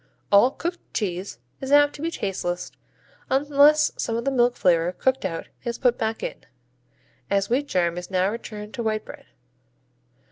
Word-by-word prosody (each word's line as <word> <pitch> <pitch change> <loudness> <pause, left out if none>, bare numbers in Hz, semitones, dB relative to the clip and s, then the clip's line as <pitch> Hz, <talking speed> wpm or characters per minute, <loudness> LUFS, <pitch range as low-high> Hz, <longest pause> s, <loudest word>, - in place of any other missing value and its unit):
All 205 +5 +7
cooked 345 +5 -4 0.2
cheese 190 -2 -3 0.2
is 265 0 -5
apt 290 0 +6
to 290 - -10
be 330 - -1
tasteless 180 - -3 0.6
unless 290 +2 +4
some 225 - -2
of 235 - -3
the 275 - +1
milk 245 -2 +3
flavor 170 -1 +2
cooked 260 +4 0
out 165 -3 -4
is 235 -1 -3
put 245 -2 +2
back 220 0 -2
in, - - -5 0.9
as 200 +2 0
wheat 280 +4 +1
germ 175 -4 0
is 180 - -9
now 185 -1 +2
returned 215 -2 -7
to 240 - -4
white 215 -1 -1
bread. - - -12
230 Hz, 170 wpm, -24 LUFS, 190-270 Hz, 0.9 s, All